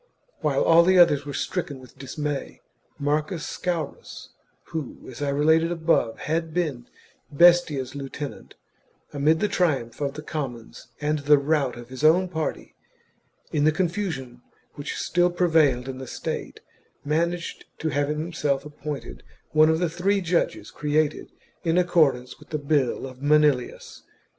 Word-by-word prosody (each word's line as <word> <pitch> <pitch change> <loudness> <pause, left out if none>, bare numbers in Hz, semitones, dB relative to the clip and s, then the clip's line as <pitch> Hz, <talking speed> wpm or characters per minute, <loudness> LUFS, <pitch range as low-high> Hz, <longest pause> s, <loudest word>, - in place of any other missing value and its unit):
While - - +1
all 170 +2 +6
others 145 -5 +5
were 145 - -4
stricken 155 -5 -3
with 130 -1 -15
dismay 140 +2 -5 0.4
Marcus 150 +3 -1
Scaurus 170 -5 -4 0.4
who, 155 -6 -4
as 130 +2 -9
I 145 - 0
related 160 +4 +3
above, 160 -9 +1
had 160 +1 -2
been 145 -9 -2 0.4
Bestia's 150 -5 +4
lieutenant, 140 +1 -7 0.6
amid 150 +3 +2
the 210 - +3
triumph 145 - 0
of 140 -1 -2
the 150 - -7
commons 125 -8 -6
and 150 0 0
the 145 +1 +5
rout 140 -3 0
of 120 0 -10
his 130 +2 -8
own 180 +4 +5
party, 160 -3 -4 0.8
in 145 - +1
the 155 - +5
confu 185 +4 -1
sion 130 -5 -7 0.3
which 145 0 -5
still 175 +1 +2
prevailed 160 -8 +2
in 130 -1 -6
the 130 - -7
state, - - -5 0.4
managed 170 +3 -1
to 160 - -2
have 145 -1 0
himself 150 -3 -1
appointed 150 - -7 0.3
one 155 +1 +5
of 160 - +3
the 175 +1 +1
three 180 +5 0
judges 175 -2 -1
created 150 0 -1 0.3
in 165 0 +1
accordance 145 -9 +2
with - - -17
the 155 - -1
bill 140 -4 0
of 130 0 -10
Manilius. 145 -3 +1
150 Hz, 145 wpm, -25 LUFS, 140-165 Hz, 0.8 s, all